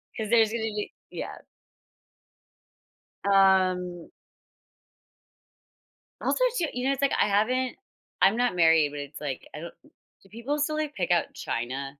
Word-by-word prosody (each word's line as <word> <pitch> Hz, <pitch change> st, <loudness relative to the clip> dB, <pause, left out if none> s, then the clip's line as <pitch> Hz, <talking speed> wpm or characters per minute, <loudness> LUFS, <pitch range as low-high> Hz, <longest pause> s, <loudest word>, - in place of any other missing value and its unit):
'Cause 215 Hz, -2 st, -4 dB
there's 225 Hz, -2 st, +4 dB
gonna 235 Hz, -1 st, -2 dB
be 210 Hz, -2 st, -3 dB, 0.2 s
Yeah. -, -, -6 dB, 1.9 s
Um 185 Hz, -3 st, +3 dB, 2.1 s
Also, -, -, +1 dB
too 340 Hz, -, +1 dB
you 250 Hz, +1 st, -3 dB
know, 275 Hz, -, +3 dB
it's 275 Hz, -, -5 dB
like 280 Hz, -, +2 dB
I -, -, +4 dB
haven't 245 Hz, +5 st, +1 dB, 0.5 s
I'm 205 Hz, +4 st, +5 dB
not 245 Hz, -5 st, +1 dB
married, 165 Hz, -3 st, +5 dB
but 145 Hz, 0 st, -7 dB
it's, 145 Hz, +1 st, -8 dB
like, 140 Hz, -3 st, -5 dB
I 150 Hz, -, -7 dB
don't 170 Hz, +1 st, -8 dB, 0.5 s
do 195 Hz, -, -21 dB
people 235 Hz, +7 st, -3 dB
still, 300 Hz, +1 st, 0 dB
like, 305 Hz, -1 st, -3 dB
pick 180 Hz, -2 st, -1 dB
out 175 Hz, -, +1 dB
china? 135 Hz, +4 st, -4 dB
200 Hz, 145 wpm, -27 LUFS, 170-245 Hz, 2.1 s, I'm